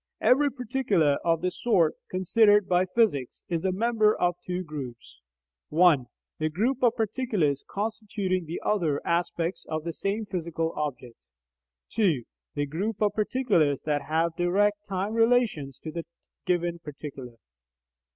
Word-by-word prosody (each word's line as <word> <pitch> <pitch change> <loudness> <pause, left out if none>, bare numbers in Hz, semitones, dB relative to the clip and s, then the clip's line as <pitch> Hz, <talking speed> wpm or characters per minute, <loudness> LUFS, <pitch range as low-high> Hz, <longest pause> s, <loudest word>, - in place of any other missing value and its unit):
Every 285 +3 +4
particular 230 - +1
of 165 -1 +2
the 180 0 0
sort 180 -10 +2 0.2
considered 205 +2 +4
by 180 +1 +2
physics 185 - 0
is 170 -2 -1
a 190 - +1
member 215 +1 +2
of 175 0 +2
two 180 0 -3
groups 130 - -8 0.5
(1) 155 -6 +4 0.3
The 155 0 0
group 230 - 0
of 240 -2 +4
particulars 210 - 0
constituting 200 -4 -2
the 165 - -4
other 165 -9 +1
aspects 170 0 -1
of 155 0 -2
the 170 0 -4
same 205 +6 -2
physical 165 -4 -3
object; 130 -5 -4 0.7
(2) 175 - +1 0.3
The 145 0 0
group 190 +9 -3
of 210 -1 +2
particulars 205 - +1
that 150 -1 0
have 160 +3 0
direct 205 +4 +1
time 195 +2 -2
relations 225 - +2
to 155 - -6
the 170 +1 -4 0.4
given 175 -1 0
particular. 140 -5 -9
180 Hz, 140 wpm, -27 LUFS, 155-210 Hz, 0.7 s, Every